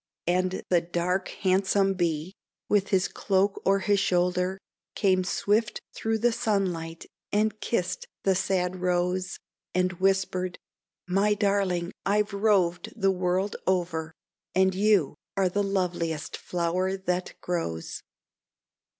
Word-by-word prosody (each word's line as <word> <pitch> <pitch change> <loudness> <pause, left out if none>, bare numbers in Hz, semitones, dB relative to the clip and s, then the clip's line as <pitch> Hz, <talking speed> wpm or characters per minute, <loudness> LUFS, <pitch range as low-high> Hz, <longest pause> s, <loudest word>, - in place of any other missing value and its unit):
And 185 +1 0
the 175 -2 +4
dark, 175 +2 -1
handsome 195 +1 +2
Bee, 170 -1 -1 0.3
with 205 -1 +2
his 190 -1 +2
cloak 195 0 0
o'er 195 0 +5
his 200 +1 +2
shoulder, 180 0 +1 0.4
Came 185 -2 +3
swift 210 +3 +1
through 225 0 -1
the 240 +2 +3
sunlight 180 -7 -1 0.3
and 215 0 +1
kissed 185 -6 -2 0.2
the 195 - +4
sad 185 -1 0
Rose, 180 0 0 0.4
And 185 0 +2
whispered: 190 -1 +1 0.5
"My 200 +3 +2
darling, 195 -4 +1
I've 210 +1 +1
roved 200 -2 +1
the 195 -1 +4
world 185 +2 0
over, 170 -4 0 0.4
And 190 0 +4
you 195 -5 +3 0.2
are 190 -2 +3
the 205 +3 0
loveliest 175 -5 -1
flower 180 +2 -1
that 180 -1 -2
grows." 125 - -3
185 Hz, 120 wpm, -27 LUFS, 180-195 Hz, 0.5 s, o'er